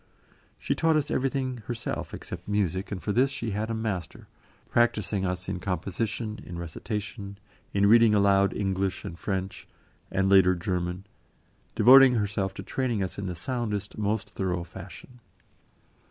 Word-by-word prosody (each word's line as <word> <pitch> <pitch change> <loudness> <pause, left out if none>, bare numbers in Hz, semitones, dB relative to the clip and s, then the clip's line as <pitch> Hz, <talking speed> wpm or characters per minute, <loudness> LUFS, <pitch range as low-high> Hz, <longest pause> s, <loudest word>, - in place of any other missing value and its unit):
She - - -1
taught 165 -1 +2
us 150 -2 0
everything 130 -1 -1
herself 120 0 -4
except - - -8
music, 100 -2 -1
and 100 - -3
for 105 - -1
this 130 +6 +3
she 120 -5 -4
had 105 +3 -2
a 115 - -1
master, 105 -6 -4 0.4
practising 105 -4 +1
us 90 0 -4
in 90 - -3
composition, 105 +4 -3
in 85 - -8
recitation, 100 +4 -5 0.3
in 100 0 +2
reading 115 0 +6
aloud 100 -1 +4
English 95 -1 -1
and 85 - -6
French, 95 -1 -4 0.4
and 95 0 +1
later, 95 -1 +6
German, 90 +1 -3 0.7
devoting 130 0 +8
herself 100 -3 -1
to 95 - -6
training 120 -1 -1
us 95 - -5
in 100 - -3
the 90 - -4
soundest, 105 +1 -3
most 105 0 -2
thorough 90 -2 -2
fashion. 95 +8 -11
100 Hz, 150 wpm, -27 LUFS, 95-115 Hz, 0.7 s, devoting